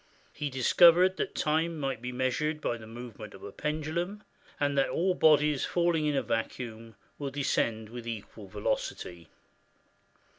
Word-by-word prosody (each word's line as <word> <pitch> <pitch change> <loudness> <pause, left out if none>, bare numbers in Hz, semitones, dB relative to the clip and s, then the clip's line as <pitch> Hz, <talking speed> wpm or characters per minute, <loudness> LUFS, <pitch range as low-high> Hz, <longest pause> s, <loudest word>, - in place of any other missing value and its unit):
He 145 - -3
discovered 175 +8 +5
that - - -3
time 160 +2 +1
might 135 -5 -2
be 125 +1 -4
measured 130 +5 -1
by 120 - -1
the 110 -1 -11
movement 115 -2 -9
of 95 - -13
a - - -7
pendulum, 160 +7 -3 0.4
and 145 -1 +1
that 135 - +2
all 185 +2 +1
bodies 150 -4 +4
falling 170 -3 +1
in 145 - +1
a 135 - +1
vacuum 115 0 -4 0.2
will 140 -1 -2
descend 115 -5 -1
with 120 0 -8
equal 110 -2 -7
velocity. 90 -4 -3
135 Hz, 150 wpm, -29 LUFS, 115-155 Hz, 0.4 s, discovered